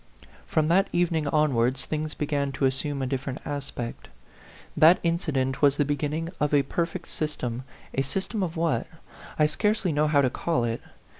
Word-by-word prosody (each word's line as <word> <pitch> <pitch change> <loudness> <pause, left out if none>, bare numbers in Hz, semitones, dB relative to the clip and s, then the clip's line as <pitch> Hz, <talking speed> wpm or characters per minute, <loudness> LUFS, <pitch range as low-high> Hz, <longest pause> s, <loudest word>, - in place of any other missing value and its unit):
From 155 -1 +2
that 195 +4 +4
evening 170 -3 +1
onwards 135 -4 +2
things 155 0 -3
began 145 -2 -1
to 135 - 0
assume 135 +1 -1
a - - 0
different 130 0 -3
aspect. 140 -5 -5 0.7
That 165 +3 +7
incident 150 -6 0
was 140 -1 +5
the 145 - +2
beginning 150 +3 -2
of 150 0 +2
a 140 - +4
perfect 170 +5 -3
system 130 -5 -3 0.3
a 135 - +1
sys 165 +8 -2
tem 215 - -3
of 170 -2 -2
what? 165 0 0 0.5
I 150 - +5
scarcely 210 +4 +1
know 150 +1 +2
how 145 -2 +4
to 130 - +2
call 165 -5 0
it. 115 0 -2
150 Hz, 170 wpm, -26 LUFS, 135-165 Hz, 0.7 s, That